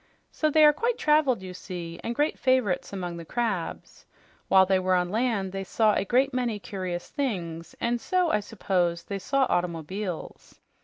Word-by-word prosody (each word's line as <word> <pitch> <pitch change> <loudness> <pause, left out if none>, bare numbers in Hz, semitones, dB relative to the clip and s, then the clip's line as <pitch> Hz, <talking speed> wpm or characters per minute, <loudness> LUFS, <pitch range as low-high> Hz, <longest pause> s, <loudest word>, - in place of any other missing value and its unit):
So 310 - +1
they 310 0 +6
are 300 - +7
quite 470 +9 -1
traveled, 295 -9 +3
you 185 -1 -7
see, 175 -2 -7
and 235 +1 -3
great 295 +3 0
favorites 255 -8 +1
among 180 -3 -4
the 170 - -7
crabs. 235 +7 -3 0.4
While 190 0 +6
they 190 0 +2
were 185 0 +2
on 180 0 0
land 220 -4 0
they 195 0 -4
saw 215 +2 +2
a - - 0
great 260 +5 +2
many 245 -4 -1
curious 185 -3 -5
things, 175 - -4
and 235 0 0
so 365 -3 +1
I 210 - +2
suppose 185 -5 -1
they 200 -1 -5
saw 270 +7 +1
automobiles." 175 +1 -4
200 Hz, 175 wpm, -27 LUFS, 180-255 Hz, 0.4 s, are